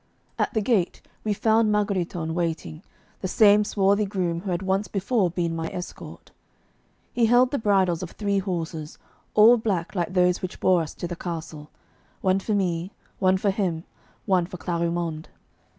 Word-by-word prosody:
At -, -, 0 dB
the 220 Hz, -, +2 dB
gate 200 Hz, -6 st, 0 dB, 0.2 s
we 215 Hz, -, -1 dB
found 220 Hz, +1 st, +2 dB
Margheritone 180 Hz, -6 st, -1 dB
waiting, 165 Hz, -2 st, -3 dB, 0.4 s
the 185 Hz, -, -3 dB
same 210 Hz, +2 st, +5 dB
swarthy 200 Hz, 0 st, +2 dB
groom 180 Hz, -4 st, -1 dB
who 195 Hz, -, -5 dB
had 180 Hz, +1 st, -1 dB
once 195 Hz, +2 st, 0 dB
before 200 Hz, -1 st, 0 dB
been 170 Hz, -1 st, -2 dB
my 165 Hz, 0 st, -3 dB
escort. 180 Hz, 0 st, -8 dB, 0.8 s
He 235 Hz, -2 st, +3 dB
held 245 Hz, +2 st, +4 dB
the 285 Hz, -, -1 dB
bridles 190 Hz, -5 st, +2 dB
of 185 Hz, -, -5 dB
three 200 Hz, 0 st, -1 dB
horses, 165 Hz, -5 st, -4 dB, 0.4 s
all 225 Hz, +3 st, +7 dB
black 195 Hz, -7 st, -2 dB
like 180 Hz, -1 st, -2 dB
those 180 Hz, 0 st, +3 dB
which 185 Hz, -1 st, -6 dB
bore 185 Hz, -2 st, +3 dB
us 155 Hz, -, -6 dB
to 175 Hz, -, -5 dB
the 175 Hz, -, -5 dB
castle 160 Hz, -3 st, -6 dB, 0.5 s
one 190 Hz, 0 st, +2 dB
for 210 Hz, +2 st, -1 dB
me, 180 Hz, -2 st, -1 dB, 0.3 s
one 190 Hz, -1 st, +3 dB
for 200 Hz, +1 st, +1 dB
him, 180 Hz, -5 st, -2 dB, 0.4 s
one 185 Hz, -4 st, +2 dB
for 180 Hz, -, -8 dB
Clarimonde. 170 Hz, -2 st, -2 dB
185 Hz, 165 wpm, -25 LUFS, 170-205 Hz, 0.8 s, all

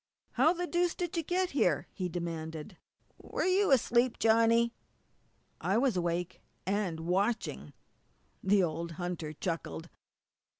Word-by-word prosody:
"How 270 Hz, +7 st, +4 dB
the 355 Hz, 0 st, -2 dB
deuce 350 Hz, 0 st, +1 dB
did 350 Hz, -1 st, -3 dB
you 335 Hz, -, +1 dB
get 360 Hz, +3 st, 0 dB
here?" 175 Hz, -, +1 dB
he 185 Hz, -2 st, -3 dB
demanded. 165 Hz, 0 st, -5 dB, 0.4 s
"Were -, -, -3 dB
you 380 Hz, +2 st, +3 dB
asleep, 245 Hz, -2 st, +3 dB
Johnny?" 230 Hz, +1 st, +4 dB, 0.9 s
"I 195 Hz, -, +1 dB
was 255 Hz, -2 st, +2 dB
awake 175 Hz, 0 st, -2 dB, 0.2 s
and 190 Hz, -4 st, -1 dB
watching!" 195 Hz, +7 st, -1 dB, 0.7 s
The 195 Hz, 0 st, +4 dB
old 165 Hz, 0 st, -2 dB
hunter 175 Hz, -2 st, -4 dB
chuckled. 165 Hz, +1 st, -4 dB
195 Hz, 125 wpm, -31 LUFS, 170-255 Hz, 0.9 s, How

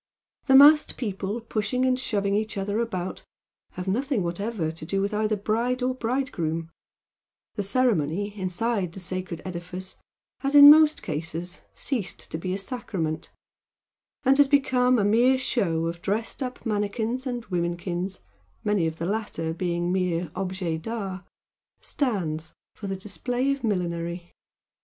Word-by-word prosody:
The 265 Hz, -, +6 dB
massed 300 Hz, +3 st, +7 dB
people 205 Hz, -1 st, -3 dB
pushing 230 Hz, +3 st, -1 dB
and 255 Hz, 0 st, +2 dB
shoving 200 Hz, -5 st, 0 dB
each 215 Hz, 0 st, -1 dB
other 200 Hz, +2 st, -1 dB
about 185 Hz, -6 st, -3 dB, 0.5 s
have 185 Hz, +1 st, -6 dB
nothing 250 Hz, +2 st, 0 dB
whatever 175 Hz, -1 st, -2 dB
to 160 Hz, -1 st, -9 dB
do 195 Hz, +5 st, -1 dB
with 200 Hz, +2 st, -1 dB
either 215 Hz, 0 st, +1 dB
bride 235 Hz, +5 st, 0 dB
or 255 Hz, +1 st, +1 dB
bridegroom, 180 Hz, -11 st, -2 dB, 0.8 s
the 210 Hz, -, -2 dB
ceremony 200 Hz, -, +1 dB
inside 190 Hz, 0 st, -1 dB
the 190 Hz, -, -8 dB
sacred 185 Hz, -2 st, -4 dB
edifice 180 Hz, +1 st, -6 dB, 0.4 s
has 275 Hz, +1 st, -1 dB
in 285 Hz, 0 st, +12 dB
most 310 Hz, 0 st, +5 dB
cases 165 Hz, +3 st, -4 dB
ceased 235 Hz, -10 st, -3 dB
to 160 Hz, -, -3 dB
be 185 Hz, +2 st, -3 dB
a 190 Hz, -, -1 dB
"sacrament" 195 Hz, -8 st, -4 dB, 0.9 s
and 270 Hz, +1 st, +4 dB
has 285 Hz, -, +7 dB
become 255 Hz, -3 st, +3 dB
a 210 Hz, -, +2 dB
mere 240 Hz, +5 st, +4 dB
show 175 Hz, -11 st, 0 dB
of 170 Hz, +1 st, -4 dB
dressed 220 Hz, +8 st, -2 dB
up 255 Hz, -1 st, -5 dB
manikins 220 Hz, +4 st, -1 dB
and 245 Hz, -2 st, -3 dB
womenkins, 175 Hz, +1 st, -2 dB, 0.4 s
many 205 Hz, -5 st, +2 dB
of 160 Hz, 0 st, -4 dB
the 165 Hz, -, -3 dB
latter 185 Hz, -5 st, -2 dB
being 175 Hz, 0 st, -1 dB
mere 180 Hz, -3 st, 0 dB
OBJECT 180 Hz, -3 st, -3 dB
D'ART, 195 Hz, -4 st, -5 dB, 0.5 s
stands 165 Hz, -, -2 dB, 0.2 s
for 205 Hz, -, -7 dB
the 195 Hz, -, -2 dB
display 245 Hz, +7 st, -1 dB
of 275 Hz, -1 st, -3 dB
millinery. 175 Hz, -4 st, -2 dB
200 Hz, 145 wpm, -26 LUFS, 175-245 Hz, 0.9 s, in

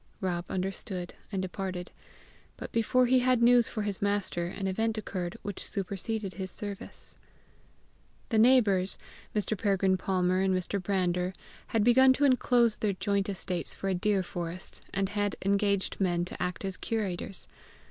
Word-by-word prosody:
Rob 175 Hz, -2 st, -2 dB
understood 185 Hz, -1 st, -3 dB, 0.2 s
and 190 Hz, -2 st, -1 dB
departed; 185 Hz, -1 st, -4 dB, 0.7 s
but -, -, -7 dB
before 250 Hz, +3 st, +3 dB
he 255 Hz, +1 st, +4 dB
had 250 Hz, -1 st, +3 dB
news 240 Hz, -1 st, +6 dB
for 215 Hz, -, -3 dB
his 205 Hz, -2 st, -3 dB
master 200 Hz, -4 st, 0 dB
an 195 Hz, +2 st, -5 dB
event 220 Hz, +4 st, 0 dB
occurred 185 Hz, -4 st, -4 dB
which 205 Hz, -2 st, -4 dB
superseded 200 Hz, +1 st, -3 dB
his 190 Hz, -1 st, -5 dB
service. 200 Hz, +1 st, -8 dB, 1.1 s
The 225 Hz, -4 st, +2 dB
neighbours, 215 Hz, -6 st, +5 dB, 0.4 s
Mr. 210 Hz, +1 st, 0 dB
Peregrine 195 Hz, -2 st, +2 dB
Palmer 185 Hz, -1 st, +1 dB
and 190 Hz, -1 st, +2 dB
Mr. 185 Hz, +2 st, -2 dB
Brander, 180 Hz, -1 st, 0 dB, 0.3 s
had 225 Hz, -2 st, +1 dB
begun 260 Hz, +3 st, +6 dB
to 285 Hz, +2 st, +2 dB
enclose 245 Hz, -3 st, +3 dB
their 210 Hz, -2 st, +1 dB
joint 200 Hz, +1 st, 0 dB
estates 185 Hz, -3 st, -3 dB
for 195 Hz, -, -3 dB
a -, -, +2 dB
deer 190 Hz, +1 st, +1 dB
forest, 175 Hz, +1 st, -4 dB
and 195 Hz, -1 st, 0 dB
had 205 Hz, -1 st, -1 dB
engaged 200 Hz, 0 st, +1 dB
men 175 Hz, -2 st, +1 dB
to -, -, -8 dB
act 180 Hz, +2 st, -2 dB
as 195 Hz, -1 st, -4 dB
curators. 195 Hz, -4 st, -3 dB
195 Hz, 155 wpm, -29 LUFS, 185-215 Hz, 1.1 s, news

